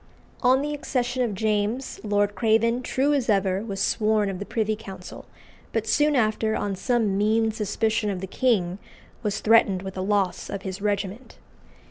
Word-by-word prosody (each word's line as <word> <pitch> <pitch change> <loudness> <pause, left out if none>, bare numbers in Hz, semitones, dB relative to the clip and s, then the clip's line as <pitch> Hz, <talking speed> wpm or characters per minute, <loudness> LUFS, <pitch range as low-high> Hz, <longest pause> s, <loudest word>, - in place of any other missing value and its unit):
On 260 +2 +4
the 295 0 -2
accession 255 -4 -1
of 230 -5 0
James, 215 +5 -1
Lord 205 -1 +1
Craven, 230 +2 +2
true 270 +3 +1
as 265 -5 0
ever, 195 -1 +2
was 200 -4 -5
sworn 215 -1 +1
of 185 - -6
the 205 - -6
Privy 220 -1 0
Council; 195 -4 -10 0.5
but 225 -1 0
soon 295 +6 +2
after, 220 -2 +1
on 200 -1 -2
some 215 -1 0
mean 220 +1 +2
suspicion 215 0 -1
of 190 -2 -2
the 190 - -4
king, 190 -4 0 0.4
was 210 -3 -2
threatened 210 -4 +4
with 190 -1 -6
the 185 - -4
loss 195 -2 0
of 195 -1 -5
his 190 0 -5
regiment. 205 +3 -3
215 Hz, 170 wpm, -25 LUFS, 200-230 Hz, 0.5 s, On